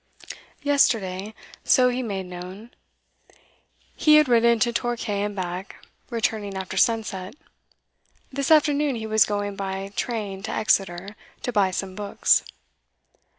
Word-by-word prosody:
Yesterday, 215 -8 +1 0.3
so 250 -1 +4
he 250 +1 -2
made 195 -6 -4
known, 180 +5 -9 1.2
he 305 -1 +5
had 305 -1 +6
ridden 235 -1 +4
to 235 +1 +1
Torquay 235 -4 -2
and 205 0 -2
back, 185 0 -5 0.3
returning 215 -4 -2
after 190 0 -5
sunset. 205 -2 0 1.0
This 275 0 -2
afternoon 295 -3 +4
he 220 -1 -5
was 220 0 +4
going 205 -1 -2
by 195 0 -4
train 205 -5 -3
to 220 - -5
Exeter, 195 -1 0 0.3
to 245 - -2
buy 200 -4 +3
some 190 +1 -4
books. 205 +1 +2
210 Hz, 125 wpm, -24 LUFS, 195-240 Hz, 1.2 s, had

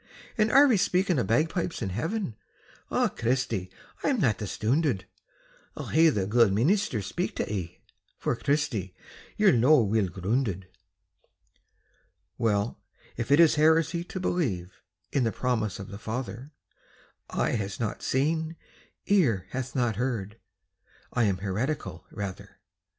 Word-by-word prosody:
"And 215 -1 +2
are 280 +2 +8
ye 250 -7 +4
speaking 180 -3 +2
o' - - +2
bagpipes 165 +9 0
in 105 - -2
Heaven? 160 - -2 0.5
Ah, - - +2
Christy, 115 -6 -1 0.3
I'm 270 -4 +1
that 110 - +2
astoonded 110 - 0 0.7
I'll - - -5
hae 160 +1 +6
the 100 -10 0
guid 115 0 +4
meenister 130 - +1
speak - - -3
tae - - -1
ye, 90 -4 -5 0.4
For, - - -1
Christy, 130 - -1 0.4
ye're 210 -2 +5
no 130 +3 +5
weel 105 -1 +1
groonded." 95 +2 -1 1.8
Well, 105 -1 0 0.3
if 120 0 -4
it 145 - +6
is 165 -2 +7
heresy 160 +2 +3
to 185 - -6
believe 100 - -2 0.3
In 135 - +1
the 115 - +1
promise 110 -6 -1
of 100 -1 -8
the 100 0 -8
Father, 120 +3 -5 0.8
"Eye - - 0
hath 100 -4 -3
not 110 -3 -3
seen, 160 +4 0 0.5
ear 135 - +3
hath 130 -1 -4
not 120 -5 +1
heard," 115 -4 -3 0.7
I 120 -2 +2
am 100 -3 +1
heretical, 105 - -3
rather. 100 -3 -7
120 Hz, 135 wpm, -27 LUFS, 100-160 Hz, 1.8 s, are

